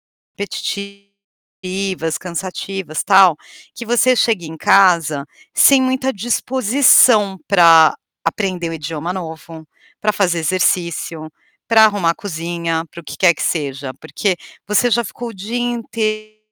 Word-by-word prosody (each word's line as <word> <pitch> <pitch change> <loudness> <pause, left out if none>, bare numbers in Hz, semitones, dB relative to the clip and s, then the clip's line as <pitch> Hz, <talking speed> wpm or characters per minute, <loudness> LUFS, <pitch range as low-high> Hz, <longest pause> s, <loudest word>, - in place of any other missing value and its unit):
repetitivas, 200 -3 -6
cansativas, 185 -1 -5
tal, 190 -4 +5 0.4
que 235 - -7
você 240 +2 +3
chega 215 -8 +1
em 160 +1 -8
casa 165 -6 +3 0.3
sem 275 -1 +5
muita 260 +1 -1
disposição 235 -2 +3
pra 165 -4 +6 0.3
aprender 185 -5 -2
um - - -5
idioma 160 +2 -5
novo, 160 -3 -8 0.3
pra 210 0 0
fazer 175 -4 0
exercício, 170 -2 -1 0.4
pra 225 -1 +5
arrumar 200 -6 +1
a - - -8
cozinha, 170 -2 -4
para 170 - -10
o - - -23
que - - -9
quer 175 -3 +4
que - - -9
seja, 140 -4 -3
porque 190 -4 -2 0.3
você 225 +4 +2
já 235 +1 +2
ficou 235 +3 -7
o - - -10
dia 210 +6 -5
intei 215 -3 -3
190 Hz, 130 wpm, -17 LUFS, 165-215 Hz, 0.4 s, pra